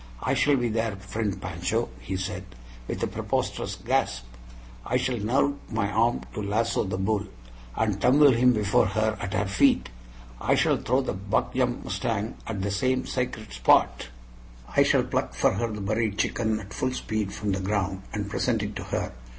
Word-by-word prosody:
"I - - +1
shall 145 -1 +3
be 120 -2 +1
there, 110 -1 -1
friend 100 +1 -3
Pancho," 90 +6 -2
he 95 - -4
said, 95 0 -4 0.4
with - - -3
a - - +4
preposterous - - -2
gasp. - - 0 0.6
"I - - +1
shall 125 -2 -1
nerve 135 +7 +2 0.2
my 100 -3 0
arm 115 +4 +2
to 105 - -4
lasso 110 +3 +1
the 95 -1 -2
bull, 100 +1 0 0.5
and 105 -3 0
tumble 140 +4 +6
him 125 +1 +5
before 105 -4 +3
her 110 +2 0
at 100 +1 -3
her 100 - +1
feet. 100 +1 +3 0.5
I - - +3
shall - - +3
throw 130 +3 +1
the 130 - -2
'buck 100 +3 -1
jump' 125 -1 0
mustang 110 -1 -2
at 100 -4 -3
the 100 - -1
same 130 +5 +1
sacred 115 - -3
spot. 60 0 +3 0.7
I - - +6
shall - - +4
pluck - - -2
for - - +3
her 115 -1 -1
the 105 -1 -5
buried 110 +1 0
chicken 110 -2 0
at 100 -1 -10
full 130 0 -1
speed 110 -5 -2
from 105 -1 -2
the 95 - 0
ground, 95 -1 -1
and 105 -1 -3
present 110 +1 0
it 105 0 -4
to - - -5
her. - - -2
105 Hz, 185 wpm, -26 LUFS, 100-115 Hz, 0.7 s, tumble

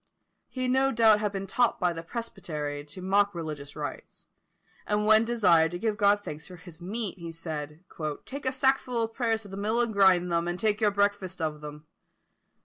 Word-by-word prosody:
He 255 -1 -3
no 265 +2 +3
doubt 220 -3 +5
had 210 -1 -1
been 195 -1 -4
taught 240 +5 +1
by 180 -1 +1
the 165 - -6
presbytery 165 -8 -5
to 150 +5 -9
mock 200 +1 +2
religious 150 -4 -6
rites; - - -7 0.6
and 210 0 +1
when 215 +1 +6
desired 180 -9 +4
to - - -2
give 215 +3 -1
God 205 0 +3
thanks 150 -2 -7
for 185 - -10
his 175 -1 -13
meat, 200 +1 -4
he 170 -1 -6
said, 160 -1 -6 0.4
"Take 275 0 -6
a - - +2
sackful 260 -3 +1
of 225 0 -4
prayers 225 -3 0
to 205 - -11
the 195 - -7
mill 215 +4 0
and 235 -2 +1
grind 185 -3 +4
them, 170 0 +1
and 175 +1 -3
take 215 -1 +1
your 210 - +5
breakfast 200 -2 0
of 155 -2 -3
them." 150 0 -9
200 Hz, 200 wpm, -28 LUFS, 170-225 Hz, 0.6 s, when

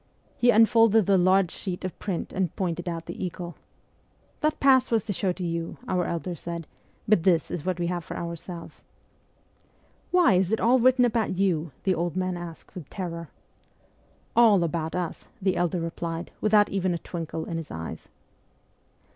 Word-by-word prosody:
He 245 - +3
unfolded 225 -1 +5
the 195 - +4
large 185 0 +4
sheet 185 -1 -5
of 185 - -6
print 190 -5 -3
and 185 -4 -1
pointed 175 -1 -2
out 165 -1 -5
the - - -6
eagle. 175 -1 -5 0.4
' - - -38
That 305 0 +1
pass 260 -2 +5
was 225 -4 +2
to 205 - -3
show 190 0 0
to 185 - -6
you,' 165 -1 -3
our 180 -1 0
elder 170 +2 -3
said, 170 0 -6 0.2
' - - -36
but 215 -5 +4
this 170 -3 +2
is 170 - -3
what 185 -1 -1
we 175 - 0
have 175 0 -2
for - - -7
ourselves.' 170 0 -7 0.7
' - - -37
Why, 355 - +5
is 185 +1 +2
it 220 - +1
all 245 +3 +4
written 255 +1 +5
about 225 -5 0
you? 170 -5 +1
' - - -35
the 190 - +2
old 170 -1 -2
man 185 -1 -1
asked 175 -2 -9
with 170 -6 -9
terror. 170 -4 -5 1.1
'All 220 -6 +6
about 165 0 -2
us,' 180 -2 -4 0.2
our 190 - +5
elder 175 0 0
replied, 165 0 -4
without 210 -1 +4
even 185 -2 0
a - - -1
twinkle 165 -1 -5
in 165 - -4
his 165 - -6
eyes. 80 0 -7
180 Hz, 190 wpm, -26 LUFS, 170-200 Hz, 1.1 s, All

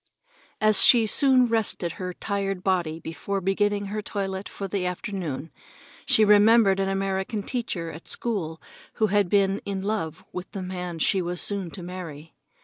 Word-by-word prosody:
As 215 -1 +4
she 235 -3 +7 0.4
rested 220 -6 0
her 180 -1 -5
tired 195 0 -3
body 175 -4 0
before 195 +5 -4
beginning 205 +2 0
her 215 - -2
toilet 195 -1 -4
for 200 - -6
the 195 -1 -2
afternoon, 180 -5 -4 0.6
she 215 - +5
remembered 210 -1 +5
an 195 0 0
American 195 +2 -2
teacher 200 -10 -3
at 160 - -11
school 175 -9 -2 0.3
who 220 - +1
had 205 -3 +3
been 195 0 +2
in 195 -1 -4
love 195 -7 -3
with 180 +1 -6
the 195 -3 -4
man 180 -2 -5
she 185 +4 +2
was 175 0 -3
soon 200 -4 0
to 180 - -9
marry. 165 -4 -8
195 Hz, 155 wpm, -25 LUFS, 180-205 Hz, 0.6 s, she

